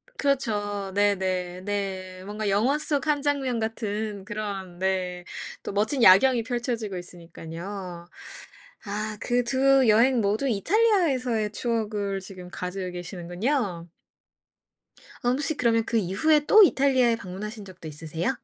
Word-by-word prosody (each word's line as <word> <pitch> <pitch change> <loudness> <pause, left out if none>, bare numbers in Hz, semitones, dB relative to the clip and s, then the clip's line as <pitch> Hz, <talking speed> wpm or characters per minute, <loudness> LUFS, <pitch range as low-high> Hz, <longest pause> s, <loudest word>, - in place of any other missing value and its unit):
그렇죠. 205 -8 -1
네네. 185 -3 0
네. 190 -2 -4
뭔가 210 0 -3
영화 235 +9 +2
속 295 -1 -1
1 290 -2 +2
장면 270 -5 0
같은 215 -2 -3
그런 195 -4 -5
네 185 -2 -1 0.4
또 - - -4
멋진 220 +6 0
야경이 230 +5 +6
펼쳐지고 235 -5 -3
있으니깐요. 175 +1 -8 0.8
아 210 +1 -4
그 245 0 +1
2 265 0 +3
여행 235 +4 +5
모두 215 +5 +1
이탈리아에서의 260 - +2
추억을 210 -4 -2
지금 185 -2 -10
가지고 180 0 -4
계시는군요. 175 - -3 1.4
어 245 - +2
혹시 290 +4 0
그러면 230 -2 +2
그 230 - 0
이후에 290 - +2
또 430 +6 +7
이탈리아에 260 -8 +3
방문하신 205 +2 -7
적도 185 -4 -11
있으세요? 160 - -2
210 Hz, 275 characters per minute, -26 LUFS, 185-245 Hz, 1.4 s, 또